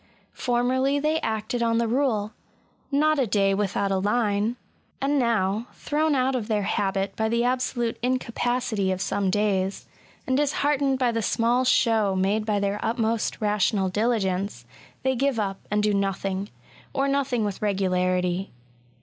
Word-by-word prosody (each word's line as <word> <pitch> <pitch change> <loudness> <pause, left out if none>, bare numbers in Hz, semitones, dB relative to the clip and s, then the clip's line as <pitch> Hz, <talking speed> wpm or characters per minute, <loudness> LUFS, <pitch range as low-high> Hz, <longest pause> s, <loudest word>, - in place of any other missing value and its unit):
Formerly 260 +3 +1
they 305 +2 0
acted 220 +1 -2
on 230 -1 +2
the 230 0 +1
rule 225 -4 0 0.2
— - - -37
" - - -39
not 305 +2 +3
a 260 - +2
day 195 -1 +2
without 200 0 0
a 190 - +1
line,'* 210 +1 +1 0.4
and 280 +1 +1
now, 225 -2 +1
thrown 305 0 0
out 260 0 +1
of 230 -4 -2
their 210 -3 0
habit 195 0 -1
by 220 0 0
the 235 +1 +1
absolute 245 -2 -1
incapacity 240 -4 -1
of 185 - -2
some 195 0 0
days, 195 -1 0 0.4
and 260 - 0
disheartened 280 -1 +1
by 250 -2 +2
the 230 0 -1
small 235 +4 +2
show 225 -6 +3
made 200 +3 0
by 210 -1 +1
their 200 +1 -1
utmost 225 -1 -1
rational 205 -2 +1
diligence, 200 -2 -1 0.4
they 265 0 +1
give 270 -1 0
up, 195 -2 -2
and 210 0 +1
do 210 0 +2
nothing, 195 0 -1 0.2
— - - -25
or 275 0 +1
nothing 270 -5 0
with 205 -2 -4
regularity. 185 -2 0
220 Hz, 160 wpm, -25 LUFS, 200-255 Hz, 0.4 s, not